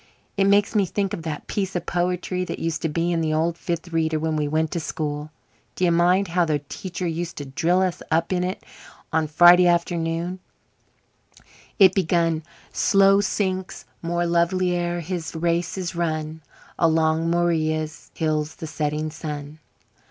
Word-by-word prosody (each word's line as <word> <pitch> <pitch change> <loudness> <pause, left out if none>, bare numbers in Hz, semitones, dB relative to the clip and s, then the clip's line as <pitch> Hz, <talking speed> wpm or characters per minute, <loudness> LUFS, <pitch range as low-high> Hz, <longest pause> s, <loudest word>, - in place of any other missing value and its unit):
"It 195 - +2
makes 200 +2 +3
me 205 -4 +2
think 195 +1 -2
of - - -4
that 155 -2 -5
piece 195 -2 -3
of 175 - -2
poetry 180 +1 -1
that - - -5
used 165 -1 -2
to 165 - 0
be 165 +3 0
in 165 -1 0
the 155 -1 0
old 165 +2 +1
Fifth 170 0 -4
Reader 160 -1 +1
when 160 0 -1
we 150 -1 0
went 155 +1 0
to 170 - -2
school. 150 -2 -4 0.5
D'ye 180 -1 +2
mind 180 +3 +3
how 175 +1 +2
the 155 -3 +1
teacher 185 -1 -5
used 170 0 -3
to 145 - -5
drill 170 +7 +1
us 185 -2 -2
up 165 +3 +1
in 180 -1 0
it 185 +1 -4 0.5
on 160 -1 +2
Friday 175 +3 +7
afternoons? 170 +1 0 1.4
It 190 -3 +7
begun 165 -3 +1 0.3
'Slow 195 0 +4
sinks 190 -2 -2 0.2
more 175 +1 -1
lovely 175 +2 +1
ere 175 0 -1
his 170 -2 -5
race 170 +2 -1
is 180 -2 -4
run 160 -2 -2 0.4
Along 160 0 +2
Morea's 160 -2 0
hills 155 -1 -1
the - - -7
setting 155 0 -2
sun.'" 150 -1 -7
170 Hz, 165 wpm, -23 LUFS, 160-180 Hz, 1.4 s, Friday